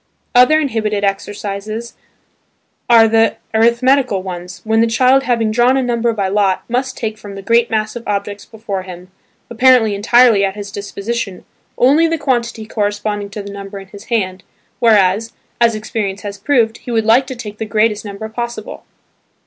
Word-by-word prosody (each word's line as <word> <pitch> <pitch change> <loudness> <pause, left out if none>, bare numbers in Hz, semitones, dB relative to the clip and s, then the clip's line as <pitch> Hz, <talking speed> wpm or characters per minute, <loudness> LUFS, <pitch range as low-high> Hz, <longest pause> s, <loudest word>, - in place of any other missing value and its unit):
Other 250 +6 +5
inhibitive 215 -8 -1
exercises 205 +3 -4 1.0
are 230 -1 +7
the 225 0 +2 0.2
arithmetical 235 -1 +2
ones, 180 0 -7
when 220 0 +2
the 230 - +3
child 255 +4 +3
having 230 -3 +1
drawn 245 +4 +3
a 265 - +1
number 235 -1 0
by 200 -4 -2
lot, 195 -1 +1
must 255 +2 -2
take 220 -2 -4
from 205 -2 -10
the 195 - -8
great 230 +3 +2
mass 215 0 -2
of 240 - -8
objects 205 0 -3
before 215 -4 -6
him, 185 0 -11 0.4
apparently 240 -2 +4
entirely 225 +1 +4
at 195 0 -1
his 205 -1 -7
disposition, 200 0 -5 0.3
only 290 +7 +4
the 330 0 -1
quantity 240 -5 -2
corresponding 205 -1 -2
to 200 +1 -7
the 200 - -8
number 200 0 -8
in 195 -1 -11
his 200 0 -12
hand, 190 -5 -2 0.4
whereas 215 -1 +3 0.3
(as 230 -2 +3
experience 210 -2 -4
has 200 -1 -6
proved) 230 -2 +1
he - - -11
would 225 -2 0
like 240 +4 +4
to 260 - -6
take 210 -3 -9
the 220 - -2
greatest 215 0 +1
number 205 +1 -7
possible. 235 -1 -6
220 Hz, 170 wpm, -16 LUFS, 200-235 Hz, 1.0 s, are